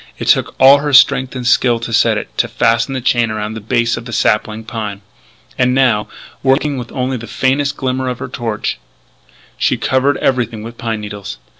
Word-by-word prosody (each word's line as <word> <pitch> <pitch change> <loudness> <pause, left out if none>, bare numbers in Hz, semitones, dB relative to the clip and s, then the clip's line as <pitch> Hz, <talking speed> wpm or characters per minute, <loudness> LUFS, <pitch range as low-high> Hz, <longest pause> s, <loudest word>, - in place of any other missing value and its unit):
It - - -5
took - - +2
all 135 +2 +7
her 145 0 -2
strength 130 -1 +4
and 125 -1 -5
skill 120 -1 +3
to 115 0 -5
set - - +3
it; - - -7
to - - +2
fasten 115 +3 +1
the 130 - -3
chain 120 -2 +1
around 110 0 -4
the 110 - -7
base 115 +1 0
of 115 - -8
the 120 - -8
sapling 110 0 0
pine. 105 -3 -6 0.6
And 125 0 +2
now, 120 -6 +2 0.3
working 135 +1 +1
with 120 - -8
only 130 0 -2
the 115 0 -9
faintest 140 +4 0
glimmer 130 -1 -2
of 125 - -4
her - - -6
torch, 115 -3 -4 0.8
she - - +1
covered 130 +1 +1
everything 120 -4 -1
with 115 +1 -10
pine 115 -2 -3
needles. 105 -1 -7
120 Hz, 195 wpm, -16 LUFS, 110-130 Hz, 0.8 s, all